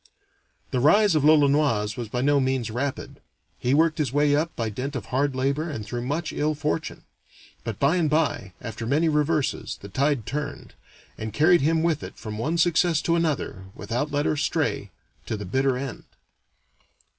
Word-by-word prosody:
The 130 Hz, -, 0 dB
rise 200 Hz, -, +5 dB
of 155 Hz, -3 st, +2 dB
l'Olonoise 145 Hz, -8 st, +3 dB
was 120 Hz, -3 st, -5 dB
by 125 Hz, +2 st, -2 dB
no 145 Hz, +1 st, +3 dB
means 130 Hz, -4 st, 0 dB
rapid. 130 Hz, +4 st, -4 dB, 0.4 s
He 125 Hz, +3 st, +1 dB
worked 160 Hz, +1 st, +3 dB
his 145 Hz, -6 st, 0 dB
way 145 Hz, +1 st, +3 dB
up 155 Hz, +3 st, +1 dB
by 115 Hz, -2 st, -2 dB
dint 135 Hz, +6 st, -4 dB
of 120 Hz, -, -4 dB
hard 135 Hz, +1 st, 0 dB
labor 140 Hz, +5 st, 0 dB
and 110 Hz, -8 st, -5 dB
through 120 Hz, +3 st, -4 dB
much 155 Hz, +3 st, -2 dB
ill 155 Hz, +1 st, 0 dB
fortune. 150 Hz, +2 st, -3 dB, 0.6 s
But 115 Hz, -4 st, -4 dB
by 145 Hz, +6 st, +2 dB
and 160 Hz, -4 st, +2 dB
by, 145 Hz, -, 0 dB
after 115 Hz, -1 st, -6 dB
many 155 Hz, +6 st, +2 dB
reverses, 150 Hz, -7 st, 0 dB
the 100 Hz, -, -10 dB
tide 135 Hz, +1 st, 0 dB
turned, 145 Hz, +4 st, -5 dB, 0.5 s
and 110 Hz, 0 st, -4 dB
carried 170 Hz, +3 st, +5 dB
him 160 Hz, +3 st, +2 dB
with 160 Hz, -3 st, +1 dB
it -, -, -9 dB
from 105 Hz, -2 st, -6 dB
one 155 Hz, +8 st, -1 dB
success 170 Hz, -1 st, +3 dB
to 170 Hz, -, +2 dB
another, 150 Hz, -, -1 dB
without 120 Hz, +8 st, -2 dB
let 145 Hz, +1 st, 0 dB
or 155 Hz, -, +1 dB
stay, -, -, -1 dB, 0.4 s
to 110 Hz, -, -2 dB
the 105 Hz, -, -6 dB
bitter 130 Hz, +6 st, +1 dB
end. 135 Hz, -1 st, -6 dB
140 Hz, 180 wpm, -25 LUFS, 120-155 Hz, 0.6 s, rise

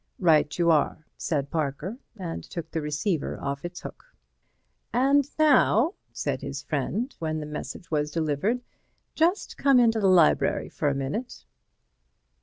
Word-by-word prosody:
"Right 155 Hz, -4 st, +3 dB
you 170 Hz, -1 st, +4 dB
are," 155 Hz, 0 st, +1 dB
said 140 Hz, -3 st, -2 dB
Parker, 155 Hz, -, -2 dB, 0.2 s
and 175 Hz, -4 st, -5 dB
took 170 Hz, -3 st, -7 dB
the 160 Hz, -, -2 dB
receiver 150 Hz, +3 st, -1 dB
off 140 Hz, 0 st, -4 dB
its 175 Hz, +1 st, -6 dB
hook. -, -, -9 dB, 0.9 s
"And 275 Hz, +2 st, +3 dB
now," 300 Hz, -, +4 dB, 0.2 s
said -, -, -3 dB
his -, -, -5 dB
friend, 245 Hz, +5 st, -2 dB
when 155 Hz, -1 st, -2 dB
the 150 Hz, -, -5 dB
message 150 Hz, +2 st, -7 dB
was 150 Hz, -1 st, +1 dB
delivered, 160 Hz, -, 0 dB, 0.5 s
"just 345 Hz, +6 st, +1 dB
come 275 Hz, -3 st, +5 dB
into 225 Hz, -2 st, +4 dB
the 200 Hz, -, +3 dB
library 180 Hz, -4 st, +4 dB
for 150 Hz, -, -1 dB
a 140 Hz, -, -1 dB
minute." 140 Hz, -, -4 dB
170 Hz, 145 wpm, -26 LUFS, 150-235 Hz, 0.9 s, come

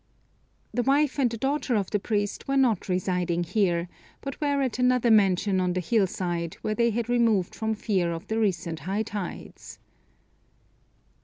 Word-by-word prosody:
The 245 Hz, -, +1 dB
wife 280 Hz, +2 st, +2 dB
and 255 Hz, -3 st, +3 dB
the 230 Hz, -, -5 dB
daughter 270 Hz, 0 st, 0 dB
of 200 Hz, -3 st, -1 dB
the 210 Hz, -, +1 dB
priest 205 Hz, 0 st, -2 dB
were 275 Hz, 0 st, +1 dB
not 235 Hz, -8 st, +2 dB
residing 180 Hz, -1 st, 0 dB
here, 175 Hz, -2 st, 0 dB, 0.3 s
but 275 Hz, +1 st, -7 dB
were 285 Hz, -2 st, +1 dB
at 255 Hz, -2 st, -2 dB
another 250 Hz, -1 st, +3 dB
mansion 195 Hz, -2 st, +3 dB
on 180 Hz, -1 st, 0 dB
the 185 Hz, -, -1 dB
hill 195 Hz, +3 st, +2 dB
side, 175 Hz, -3 st, -3 dB
where 215 Hz, -, 0 dB
they 235 Hz, +1 st, +2 dB
had 230 Hz, 0 st, -2 dB
removed 230 Hz, -6 st, +2 dB
from 220 Hz, -1 st, -2 dB
fear 190 Hz, -5 st, 0 dB
of 165 Hz, 0 st, -5 dB
the 220 Hz, +1 st, -2 dB
recent 170 Hz, -6 st, -1 dB
high 195 Hz, +8 st, -2 dB
tides. 205 Hz, -4 st, -7 dB
210 Hz, 170 wpm, -26 LUFS, 180-240 Hz, 0.3 s, and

